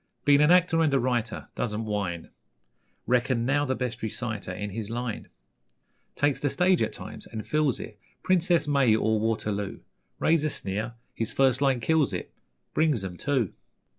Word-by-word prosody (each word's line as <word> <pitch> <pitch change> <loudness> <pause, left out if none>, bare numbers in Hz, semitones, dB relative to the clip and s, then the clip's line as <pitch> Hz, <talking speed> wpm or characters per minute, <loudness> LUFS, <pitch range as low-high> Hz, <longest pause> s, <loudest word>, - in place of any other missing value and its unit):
Been 145 0 +6
an 150 - +5
actor 175 -2 +5
and 155 -3 +3
a - - +4
writer 120 -3 -1
Doesn't 110 -1 -2
whine 100 -6 -3 0.7
Reckoned 125 0 +1
now 145 +3 +2
the 130 -1 0
best 125 -2 -4
reciter 110 -3 -3
In 100 +3 -5
his 110 +1 -5
line. 120 -1 -4 0.9
Takes 145 -1 +1
the 145 - 0
stage 180 +4 +3
at - - +1
times, - - -9
and 110 -1 -6
fills 150 -4 +1
it 105 -2 -9 0.2
'Princess 175 -3 +2
May' 135 -6 +4
or 110 0 +1
'Waterloo'. 105 -2 -2 0.4
Raise 160 -1 +2
a 155 - +1
sneer! 105 +1 -3 0.2
his 115 - -3
first 135 -1 +3
line 135 -3 +2
kills 160 +2 +2
it, - - -5 0.4
'Brings 150 -9 +2
'em', 90 -2 -5
too. 130 -6 0
125 Hz, 165 wpm, -27 LUFS, 110-145 Hz, 0.9 s, Been